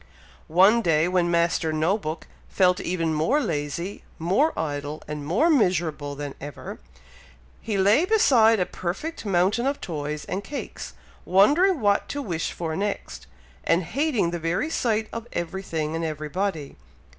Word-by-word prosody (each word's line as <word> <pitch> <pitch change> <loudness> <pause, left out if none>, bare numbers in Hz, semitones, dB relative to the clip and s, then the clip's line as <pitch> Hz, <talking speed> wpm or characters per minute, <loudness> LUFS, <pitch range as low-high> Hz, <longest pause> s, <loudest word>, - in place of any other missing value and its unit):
One 195 +8 +5
day, 165 -4 +2
when 180 -1 +1
Master 170 -1 +1
No 155 +5 +1
book 160 -6 -5 0.2
felt 180 -1 +3
even 165 -3 -1
more 160 - +2
lazy, 170 - -3
more 195 - +2
idle, 145 -1 -4
and 150 -1 -5
more 180 - +2
miserable 170 - +1
than 145 -1 -5
ever, 145 -1 -8 0.8
he 215 -3 -2
lay 205 - +4
beside 240 - +4
a 180 - +2
perfect 205 - -5
mountain 200 +7 +2
of 280 +1 -1
toys 150 -2 -4
and 190 +2 -4
cakes, 280 +7 -7 0.3
wondering 295 - +4
what 205 -1 +2
to 285 - -3
wish 170 -7 -2
for 160 -2 -4
next, 200 +3 -4 0.4
and 170 +2 +2
hating 250 - 0
the 175 - -3
very 175 - -1
sight 220 -6 0
of 230 0 -6
everything 165 -3 -3
and 165 - -2
everybody. 155 +1 -3
180 Hz, 145 wpm, -25 LUFS, 160-220 Hz, 0.8 s, One